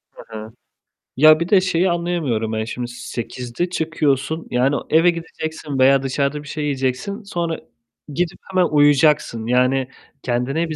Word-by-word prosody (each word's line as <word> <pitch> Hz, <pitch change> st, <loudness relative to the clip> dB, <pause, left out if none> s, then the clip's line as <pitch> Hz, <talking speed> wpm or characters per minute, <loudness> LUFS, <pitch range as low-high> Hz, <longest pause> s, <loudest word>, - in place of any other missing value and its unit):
Hı 110 Hz, -, -10 dB
hı. 110 Hz, +1 st, -8 dB, 0.7 s
Ya, 155 Hz, +2 st, +7 dB
bir 170 Hz, +2 st, -2 dB
de 200 Hz, -3 st, +5 dB
şeyi 185 Hz, 0 st, +1 dB
anlayamıyorum 160 Hz, -11 st, -1 dB
ben 110 Hz, 0 st, -1 dB
şimdi. 120 Hz, +2 st, -5 dB
8'de 125 Hz, +5 st, -5 dB
çıkıyorsun. 155 Hz, -2 st, -1 dB
Yani, 130 Hz, +3 st, +2 dB
eve 165 Hz, +3 st, +5 dB
gideceksin 160 Hz, -4 st, -5 dB
veya 135 Hz, +1 st, +5 dB
dışarıda 140 Hz, +2 st, -1 dB
bir -, -, -13 dB
şey 150 Hz, +1 st, -4 dB
yiyeceksin, 140 Hz, -, -2 dB
sonra 170 Hz, -4 st, -3 dB, 0.5 s
gidip 175 Hz, +1 st, -2 dB
hemen 185 Hz, -1 st, +3 dB
uyuyacaksın. 145 Hz, -5 st, +3 dB
Yani, 125 Hz, +1 st, +2 dB, 0.4 s
kendine 135 Hz, +7 st, -1 dB
bir 155 Hz, -, -4 dB
145 Hz, 145 wpm, -20 LUFS, 125-165 Hz, 0.7 s, Ya